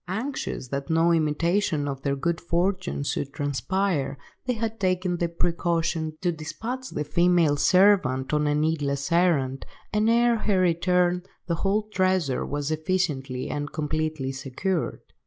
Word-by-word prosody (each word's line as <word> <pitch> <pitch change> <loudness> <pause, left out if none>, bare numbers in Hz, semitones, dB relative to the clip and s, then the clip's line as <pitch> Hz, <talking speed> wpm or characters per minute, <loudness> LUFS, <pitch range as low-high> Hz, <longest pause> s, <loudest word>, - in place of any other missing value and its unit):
Anxious 220 - -4
that 140 +1 -4
no 165 +1 +3
intimation 165 0 +1
of 135 -1 -4
their 140 0 0
good 170 +4 -1
fortune 180 -1 -1
should 140 -1 -2
transpire, 145 - -1 0.3
they 250 - +2
had 225 -1 -3
taken 185 -2 0
the 170 0 0
precaution 165 -2 -1
to 175 - +1
despatch 230 +11 -5
the 150 - -3
female 170 0 +3
servant 155 -7 +3
on 150 0 +2
a 145 - +2
needless 150 -1 0
errand, 155 -7 +2 0.3
and 215 +1 +3
ere 235 0 +4
her 205 -3 +1
return 180 0 +2 0.2
the 170 - -1
whole 195 +5 +1
treasure 185 -9 0
was 145 +1 -3
efficiently 155 -6 -1
and 145 0 -4
completely 155 -2 -2
secured. 135 +7 -3
170 Hz, 140 wpm, -25 LUFS, 145-185 Hz, 0.3 s, ere